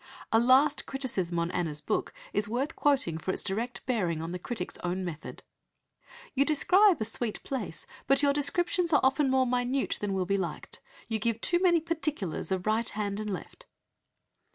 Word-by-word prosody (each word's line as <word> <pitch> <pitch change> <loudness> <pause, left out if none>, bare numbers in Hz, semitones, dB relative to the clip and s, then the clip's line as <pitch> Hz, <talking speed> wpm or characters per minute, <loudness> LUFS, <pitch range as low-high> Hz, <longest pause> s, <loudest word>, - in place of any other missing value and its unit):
A 225 - +5
last 265 +5 +4
criticism 205 -11 -2
on 170 +1 0
Anna's 160 -4 -1
book 150 - -2 0.2
is 205 0 0
worth 265 +7 -2
quoting 260 - +1
for 175 - -6
its - - -1
direct 230 +6 -3
bearing 185 -11 0
on 165 +1 -4
the 180 - -4
critic's 180 -1 -5
own 180 +1 -2
method. 165 -3 -7 0.9
"You 275 - +3
describe 360 +4 +4
a 220 - -1
sweet 225 0 -2
place, 230 -11 -4 0.2
but 275 +1 +3
your 280 -1 +4
descriptions 340 +4 +1
are 290 - +5
often 270 +1 +3
more 260 0 +3
minute 250 +2 0
than 205 -1 -1
will 190 -1 0
be 200 +2 +1
liked. 175 -5 -5 0.3
You 225 -1 -1
give 230 +1 -1
too 345 +8 +3
many 350 -3 +4
particulars 305 - -2
of 185 -1 -1
right 220 +1 +1
hand 205 -1 -3
and 215 0 -3
left." 185 -5 -7
230 Hz, 180 wpm, -29 LUFS, 190-280 Hz, 0.9 s, A